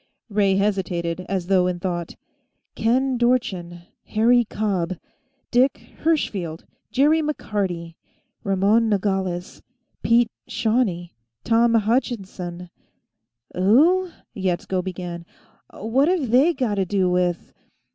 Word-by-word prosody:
Ray 200 -2 +2
hesitated, 185 -4 -1
as 190 -2 -1
though 185 -1 +3
in 180 -1 -2
thought. 175 -2 -4 0.6
"Ken 255 +2 +1
Dorchin; 185 -9 0 0.2
Harry 235 +2 +3
Cobb; 190 -5 -2 0.5
Dick 250 +3 +1
Hirschfield; 195 - -1 0.3
Jerry 300 +4 +3
McCarty; 195 - -3 0.5
Ramon 205 +4 +2
Nogales; 190 -3 -2 0.4
Pete 230 0 +3 0.2
Shawne; 210 -7 0 0.3
Tom 230 0 +3
Hutchinson 195 -6 -2 0.4
" 120 +1 -35
"Who 310 - +4
?" - - -44
Yetsko 185 -1 -1
began. 175 -2 -6 0.5
"What've 270 - 0
they 280 +8 +4
gotta 215 -7 0
do 190 0 +1
with 180 -1 -1
200 Hz, 100 wpm, -23 LUFS, 180-240 Hz, 0.6 s, Who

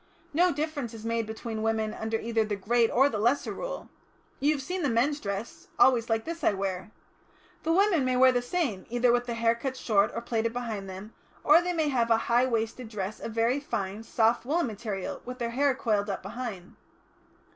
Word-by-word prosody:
No 355 +4 +4
difference 290 -6 -3
is 220 0 -9
made 230 -1 -1
between 220 0 -5
women 220 -1 0
under 220 0 -2
either 225 -1 0
the 210 -1 -2
Great 230 +4 +2
or 270 +3 +4
the 220 -7 -2
Lesser 240 +7 +1
Rule. - - -5 0.5
You 285 +3 +3
have 285 - -4
seen 360 +6 -3
the 290 - +1
men's 265 +6 +1
dress 200 +1 -5
always 240 -3 +4
like 225 0 0
this 335 0 -6
I - - +4
wear. 190 0 -3 0.7
The 325 - 0
women 370 -4 +3
may 255 -1 +1
wear 260 0 +7
the 245 -1 +1
same, 245 - -2
either 240 +1 +3
with 245 +1 +1
the 235 - -2
hair 230 0 +3
cut 260 +3 -4
short 205 -4 +2
or - - -2
plaited 230 -1 -1
behind 220 -5 -4
them, 190 +4 -9 0.3
or 305 +3 +7
they 355 0 -1
may 315 -3 +1
have 240 -4 +1
a 225 - +5
high 240 +3 +2
waisted 225 0 -2
dress 205 -1 -4
of 225 - -6
very 230 +4 +2
fine, 200 -7 -4
soft 225 +1 +2
woollen 310 +7 +1
material, 210 -4 -5
with 250 +1 -7
their 235 -2 -2
hair 275 +2 +2
coiled 210 -6 0
up 195 - -3
behind." 200 -3 -6
235 Hz, 210 wpm, -28 LUFS, 220-265 Hz, 0.7 s, wear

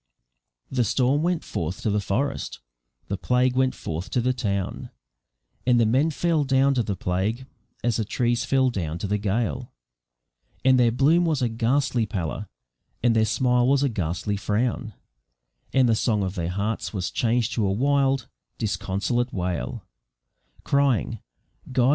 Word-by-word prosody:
The 125 -2 +2
storm 130 +6 +2
went 175 0 0
forth 85 +3 -4
to 110 - +1
the 105 - +2
forest, 135 +8 -2 0.5
the 100 - -2
plague 125 0 +2
went 130 0 +2
forth 80 +3 -5
to - - 0
the 125 +2 +1
town, 100 -6 -3 0.7
And 125 -1 +3
the 115 - +4
men 130 +8 +3
fell 160 0 +1
down 135 0 +3
to 125 - +2
the 105 -3 -2
plague, 95 +8 -1 0.4
as 120 -2 +1
the 110 - 0
trees 120 +2 0
fell 130 -1 +2
down 85 -7 -3
to 85 - -4
the 105 +1 0
gale; 105 +3 -1 0.9
And 130 -1 +6
their 120 -1 +5
bloom 145 +8 +4
was 155 -6 +1
a 120 - +2
ghastly 115 0 +1
pallor, 100 +1 -3 0.6
and 120 -2 +4
their 110 -1 +4
smile 125 +2 +2
was 140 +1 +3
a 140 - +2
ghastly 100 0 -2
frown, 110 +1 -1 0.8
And 130 -2 +4
the 115 - +4
song 110 -1 +1
of 95 -1 -2
their 85 -3 -2
hearts 100 +5 -2
was 95 -3 -2
changed 120 0 +1
to 110 -4 +1
a - - +1
wild, 135 +3 +2 0.3
disconsolate 110 +3 -1
wail, 90 -2 -3 0.8
Crying 135 -5 +1 0.5
"God! 125 0 +3
120 Hz, 160 wpm, -25 LUFS, 100-130 Hz, 0.9 s, And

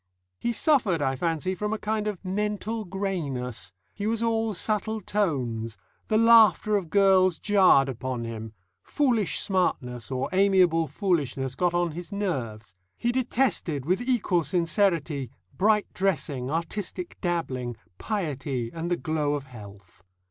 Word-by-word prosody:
He 235 - 0
suffered, 230 - +2
I 135 -2 0
fancy, 165 +5 -1
from 210 +3 -2
a - - -1
kind 215 0 -2
of 200 -2 -5
mental 210 +3 -2
greyness; 150 - -3 0.2
he 205 0 -3
was 225 +1 0
all 225 -2 0
subtle 215 +3 -1
tones; 125 - -2 0.3
the 215 - +2
laughter 220 -3 +6
of 190 -5 -1
girls 190 -2 +4
jarred 190 -9 +5
upon 130 -1 -4
him; 110 -1 -6 0.3
foolish 235 - +1
smartness 125 - -1
or 130 0 -1
amiable 185 -4 +4
foolishness 140 -6 -1
got 175 +4 0
on 175 -1 +1
his 175 +5 -8
nerves; 120 - -3 0.2
he 240 - 0
detested, 240 - 0
with 185 +8 +1
equal 235 -8 +1
sincerity, 165 - 0 0.3
bright 210 +1 +3
dressing, 150 -9 -1
artistic 175 +3 -4
dabbling, 130 -9 -2 0.2
piety, 140 - -3
and 165 +1 -4
the 175 - +1
glow 155 -3 -1
of 145 - -4
health. 100 -8 -13
175 Hz, 135 wpm, -26 LUFS, 135-210 Hz, 0.3 s, laughter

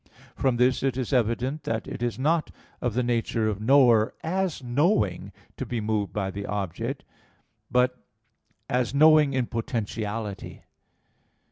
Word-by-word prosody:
From 130 -3 +1
this 125 +1 +3
it 130 -2 0
is 130 +1 -2
evident 125 +4 0
that 115 -1 -3
it - - -6
is 120 -1 -1
not 155 +4 +1 0.3
of 120 -3 -1
the 125 - +1
nature 115 -2 0
of 105 -1 -2
knower, 120 -2 +4
as 180 -3 -1
knowing, 120 - +1 0.3
to - - -3
be 120 -1 -2
moved 105 -3 -1
by 95 -1 -2
the 100 +1 -6
object, 95 -4 -3 0.7
but 125 0 +2 0.7
as 125 +1 0
knowing 155 -1 +6
in 130 -2 +1
potentiality. 110 -3 -4
120 Hz, 140 wpm, -26 LUFS, 110-135 Hz, 0.7 s, knowing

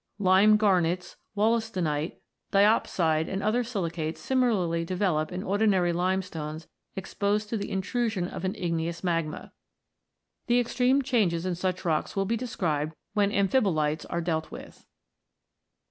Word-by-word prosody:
Lime 200 +2 +5
garnets, 180 -4 +1 0.2
wollastonite, 200 -8 0 0.3
di 200 0 +4
opside, 165 -7 +2
and 195 +1 -3
other 235 +4 +2
silicates 170 -8 -3
similarly 205 -11 +1
develop 175 -3 0
in 180 +1 -4
ordinary 195 -3 +2
limestones 170 -4 -2 0.3
exposed 205 +2 -1
to 230 - -2
the 200 - -4
intrusion 200 -1 -1
of 180 - -7
an 190 +1 -1
igneous 170 0 -2
magma. 165 -4 -2 1.0
The 240 0 +4
extreme 250 +3 +2
changes 200 -10 +1
in 185 - 0
such 185 +1 -3
rocks 155 -3 0
will 195 0 +1
be 225 +4 0
described 165 - -2 0.2
when 205 -1 +2
amphibolites 185 - +1
are 170 - -1
dealt 160 -2 -2
with. - - -11
185 Hz, 130 wpm, -27 LUFS, 165-210 Hz, 1.0 s, Lime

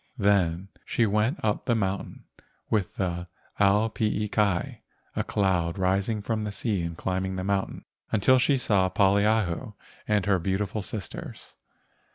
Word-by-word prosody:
Then 100 -4 +2
she 115 - +1
went 105 - +1
up 105 - 0
the 120 - +2
mountain 100 -2 -3 0.5
with 105 -5 0
the 90 -2 -2 0.3
ao 105 +2 +4
pii 105 -2 -1
kai 100 -5 0 0.3
(a - - 0
cloud 95 -3 0
rising 100 +3 0
from 110 0 -1
the 105 -1 -3
sea 100 -1 -1
and 85 -1 -4
climbing 95 0 -2
the 95 - -3
mountain) 100 0 -2 0.3
until 130 +5 +4
she 135 +2 +3
saw 100 -7 +2
Poliahu 100 -1 +2 0.3
and 105 -3 +2
her 95 -2 +3
beau¬ 95 +2 0
tiful 105 +1 -3
sisters. 95 -1 -6
100 Hz, 150 wpm, -27 LUFS, 95-105 Hz, 0.5 s, ao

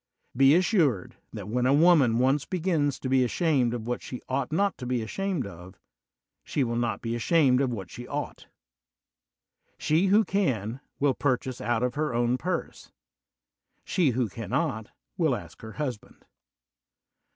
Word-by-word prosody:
Be 135 +3 +6
assured 170 - +1
that 105 -3 -7
when 125 +3 0
a 135 - +4
woman 150 -8 +5
once 135 +3 +2
begins 160 -6 0
to - - -5
be 130 0 +3
ashamed 130 -2 +1
of 115 -2 -6
what 120 +1 -3
she 125 - -7
ought 130 0 -2
not 200 +5 +1
to 125 - -6
be 125 -2 -1
ashamed 190 - -2
of, 95 0 -11 0.7
she 145 - -1
will 120 -1 -2
not 120 -1 -1
be 115 0 -2
ashamed 130 +2 +3
of 135 - +1
what 95 -6 -6
she 120 +1 -8
ought. 145 0 -5 1.3
She 165 +6 +2
who 210 +3 +4
can, 130 - -1 0.2
will 140 -1 +3
purchase 130 -2 -1
out 120 0 0
of 125 -1 0
her 150 -4 -2
own 120 +1 +1
purse; 180 +2 -4 0.9
she 170 -6 +2
who 125 -1 0
cannot, 110 - -3 0.3
will 160 -7 +2
ask 85 -7 -10
her 110 -1 -9
husband. 130 -9 -6
130 Hz, 160 wpm, -27 LUFS, 120-155 Hz, 1.3 s, Be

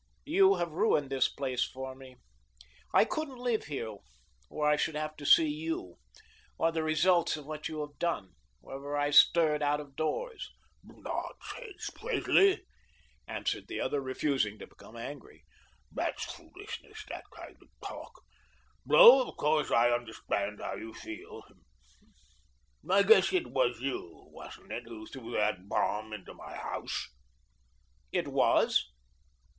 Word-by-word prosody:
You 195 0 +5
have 175 -2 -2
ruined 150 -5 +1
this 135 -2 +2
place 130 -3 -1
for 130 0 -6
me. 130 -1 -13 0.8
I - - +5
couldn't 285 0 -4
live 245 -3 -1
here 115 -8 -5 0.5
where 150 - -1
I 150 - +5
should 150 +1 -1
have 155 0 -3
to 145 -1 -6
see 160 - +7
you, 150 - -4 0.6
or 165 - +2
the 160 -1 -1
results 160 +2 +2
of 150 - -10
what 155 0 -5
you 155 -1 -4
have 145 0 -8
done, 130 - -2 0.3
whenever 140 +2 -5
I 145 0 +1
stirred 150 0 +6
out 145 0 +1
of 140 -2 -11
doors." 425 - -3 0.3
"Nonsense, 435 -6 -7
Presley," 395 -5 +2 0.6
answered - - -3
the - - -5
other, 145 - -1
refusing 130 -5 -1
to - - -9
become 115 - -15
angry. 135 +5 -9 0.5
"That's - - -2
foolishness, 405 +3 -10
that - - -7
kind - - -11
of - - -20 0.2
talk; - - -10 0.6
though, 475 - +9
of - - -13
course, 150 0 +1
I 120 +1 +4
understand 110 -3 -2
how - - -4
you 110 0 -9
feel. 390 +7 -9 1.5
I - - +5
guess 450 - +6
it 365 -3 0
was 125 -3 +1
you, 130 -11 -5
wasn't - - -12
it, 120 - -5
who 110 -2 -9
threw 120 -1 -9
that 105 -2 0
bomb 110 +1 -1
into 105 -3 -8
my - - -10
house?" - - -4 1.0
"It - - -1
was." - - +3
150 Hz, 145 wpm, -31 LUFS, 125-170 Hz, 1.5 s, though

